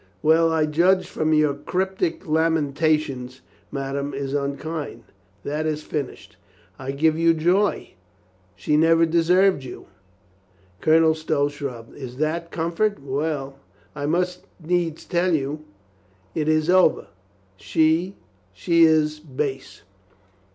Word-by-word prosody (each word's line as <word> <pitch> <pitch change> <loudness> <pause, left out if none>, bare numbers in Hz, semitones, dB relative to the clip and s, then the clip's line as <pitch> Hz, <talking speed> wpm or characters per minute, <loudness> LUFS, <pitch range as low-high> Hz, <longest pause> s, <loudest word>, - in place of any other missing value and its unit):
"Well, 165 +1 +4
I 160 -1 +2
judge 175 +5 +2
from 155 0 -2
your 150 -2 +3
cryptic 185 +3 -2
lamentations 155 -4 0 0.3
ma 135 -1 -4
dame 140 0 -3
is 135 0 -4
unkind?" 140 -2 -4 0.4
"That 150 +2 -2
is 155 0 -2
finished." 125 -10 -6 0.4
"I 135 0 -6
give 155 +3 +1
you 165 0 +4
joy. 180 +6 +1 0.6
She 150 - 0
never 165 +1 +4
deserved 170 0 +3
you." 125 - -9 1.0
Colonel 160 0 +4
Stow 155 -2 0
shrugged. 140 -6 -7
"Is 130 -3 -8
that 165 +3 -2
comfort?... 170 +6 -1
Well... 140 0 -3 0.4
I 145 - -3
must 180 +3 -1
needs 170 -1 -1
tell 175 -1 +1
you... 150 +1 -3 0.7
It 155 -1 -2
is 155 0 +2
over... 185 -3 +4 0.5
She... 160 - +1 0.4
she 165 - +1
is 155 -1 +3
base." 140 -2 -5
155 Hz, 120 wpm, -23 LUFS, 140-165 Hz, 1.0 s, Well